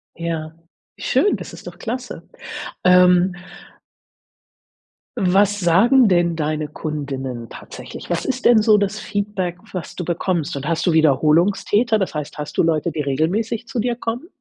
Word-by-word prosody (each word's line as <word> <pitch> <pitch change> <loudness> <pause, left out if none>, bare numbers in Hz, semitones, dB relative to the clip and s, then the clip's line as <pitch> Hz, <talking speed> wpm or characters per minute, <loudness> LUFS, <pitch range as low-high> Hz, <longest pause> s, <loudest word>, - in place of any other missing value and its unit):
Ja, 165 -1 -4 0.4
schön, 415 - +2
das - - -9
ist - - -12
doch - - -9
klasse. 245 +2 -6 0.6
Ähm 180 0 +5 1.8
Was 200 0 +2
sagen 220 +9 +5
denn 175 -2 +2
deine 155 -1 -2
Kundinnen 135 -6 -5
tatsächlich? - - -10
Was - - -1
ist 255 -1 -3
denn 230 -3 +6
so 215 -2 +5
das 205 +1 -1
Feedback, 200 -4 -3
was 180 -4 -6
du 180 - -4
bekommst? 170 -1 -2
Und 140 +1 -5
hast 165 +2 -1
du - - +4
Wiederholungstäter? 170 - +3
Das 185 -5 -2
heißt, 150 0 -5
hast 150 - -6
du - - +4
Leute, 160 -2 +1
die 150 - -3
regelmäßig 185 - -1
zu 245 - -6
dir 240 +2 0
kommen? 240 +6 -4
180 Hz, 150 wpm, -20 LUFS, 155-215 Hz, 1.8 s, denn